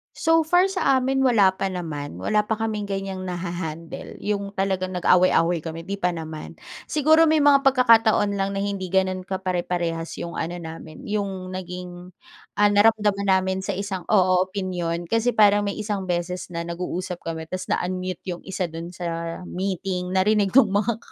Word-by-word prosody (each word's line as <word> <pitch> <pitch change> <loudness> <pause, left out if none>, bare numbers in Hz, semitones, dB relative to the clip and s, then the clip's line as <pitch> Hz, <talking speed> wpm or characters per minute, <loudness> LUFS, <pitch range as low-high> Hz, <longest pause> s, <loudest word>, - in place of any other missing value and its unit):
So 325 0 +3
far, 360 +3 +4
sa 320 -8 +2
amin 265 +1 0
wala 230 -8 +5
pa 195 - -1
naman. 160 - -5
Wala 210 - +1
pa 220 - +1
kaming 215 -2 -3
ganyang 195 -1 -4
naha-handle 170 -2 -5
yung 200 -1 -2
talagang 190 -1 -1
nag-away-away 175 -1 +3
kami 165 +1 -7
'di 200 +3 -5
pa 180 -2 0
naman. 160 -1 -7 0.3
Siguro 315 +2 +4
may 310 -1 +3
mga 285 -1 +6
pagkakataon 225 -5 +4
lang 195 0 -1
na 195 - -1
hindi 200 -2 -3
gano'n 185 0 0
ka 190 -1 -3
pare-parehas 175 -2 -2
yung 170 - -6
ano 170 +2 -3
namin, 160 -2 -9
yung 195 -3 -3
naging, 180 -1 -7 0.5
ah, 205 0 +5
naramdaman 205 -1 +3
namin 190 0 +2
sa 195 0 -3
isang 195 -2 -4
oo, 185 -3 +4
opinyon. 180 -3 -3
Kasi 230 +1 +1
parang 205 -1 +5
may 200 - -2
isang 205 -3 -3
beses 175 +1 -2
na 170 0 -3
nag-uusap 180 +1 -4
kami 160 -1 -5
tas 185 +3 -5
na-unmute 185 0 -2
yung 175 - -6
isa 190 -1 -2
do'n 165 +1 -7
sa 175 - -6 0.4
meeting 185 -1 -3
narinig 205 +1 +3
nung 230 -7 +6
mga 210 +2 +1
190 Hz, 170 wpm, -24 LUFS, 175-205 Hz, 0.5 s, mga